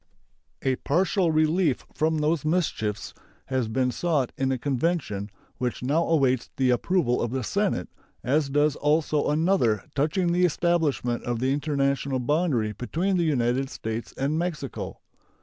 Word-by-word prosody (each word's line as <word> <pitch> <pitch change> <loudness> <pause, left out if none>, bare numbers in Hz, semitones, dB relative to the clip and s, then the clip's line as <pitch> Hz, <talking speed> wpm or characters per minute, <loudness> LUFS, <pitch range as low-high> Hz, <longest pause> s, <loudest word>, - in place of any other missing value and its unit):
A 130 -1 +1
partial 180 +2 +1
relief 155 -1 +2
from 160 +1 +1
these 155 0 +1
mischiefs 150 - -1 0.3
has 130 -3 -1
been 125 +3 0
sought 150 -4 0
in 135 0 0
a 130 - 0
convention, 130 - -1 0.3
which 125 0 -2
now 150 +6 +1
awaits 135 -7 +2
the 130 -2 +3
approval 125 0 +1
of 120 - -1
the 130 +1 -2
Senate, 195 - 0 0.4
as 140 +3 +1
does 145 +1 +2
also 150 0 +1
another 150 - +2
touching 160 +5 +1
the 180 +1 +2
establishment 160 -8 +1
of 120 -1 -2
the 130 +3 +1
international 140 -2 0
boundary 130 -5 +1
between 170 - -1
the 170 - +2
United 130 -2 +1
States 110 -1 -5
and 145 +4 0
Mexico. 175 -4 -4
145 Hz, 145 wpm, -26 LUFS, 125-165 Hz, 0.4 s, the